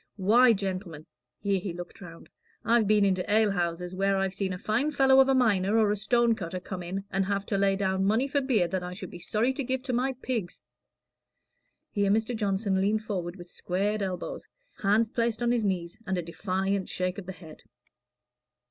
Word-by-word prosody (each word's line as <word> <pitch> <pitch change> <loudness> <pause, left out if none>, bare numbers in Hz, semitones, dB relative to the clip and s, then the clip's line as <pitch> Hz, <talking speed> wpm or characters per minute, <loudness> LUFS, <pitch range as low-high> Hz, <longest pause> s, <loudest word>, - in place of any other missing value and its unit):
Why, 230 +6 +5
gentlemen" 185 -6 -4 0.3
here 200 -1 0
he 185 -1 -5
looked 175 +2 -9
round 165 -3 -11 0.4
"I've 230 -1 +3
been 210 -1 +4
into 185 -2 +1
ale 215 -1 +4
houses 175 -1 -2
where 195 +1 +1
I've 190 -1 0
seen 195 0 -2
a 180 - -3
fine 220 +9 0
fellow 270 -2 +4
of 270 0 +6
a 270 - +4
miner 210 -4 +3
or 215 -2 +4
a - - +1
stone 235 +3 +2
cutter 185 -4 -5
come 185 0 -6
in 185 +3 -4
and 195 - +1
have 200 0 -1
to 200 - -1
lay 195 0 +3
down 190 -1 0
money 225 +7 +2
for 280 0 0
beer 235 -10 +2
that 185 +2 -2
I 180 0 -6
should 185 0 -8
be 175 - -9
sorry 220 +8 0
to 275 - -3
give 260 0 -2
to 265 -2 -3
my 260 +2 +1
pigs!" 245 -7 -4 1.3
Here 200 -1 +1
Mr. 220 +4 +1
Johnson 195 -2 0
leaned 215 +2 +1
forward 180 -4 -4
with 175 -2 -12
squared 205 +4 -1
elbows, 195 - -4 0.3
hands 215 +2 +2
placed 235 0 -1
on 240 - +2
his 240 -2 +1
knees, 180 -3 -2
and 190 -1 0
a 175 - -2
defiant 190 +3 -2
shake 185 +2 -2
of 185 - -10
the - - -4
head. 165 -4 -13
200 Hz, 205 wpm, -28 LUFS, 185-225 Hz, 1.3 s, of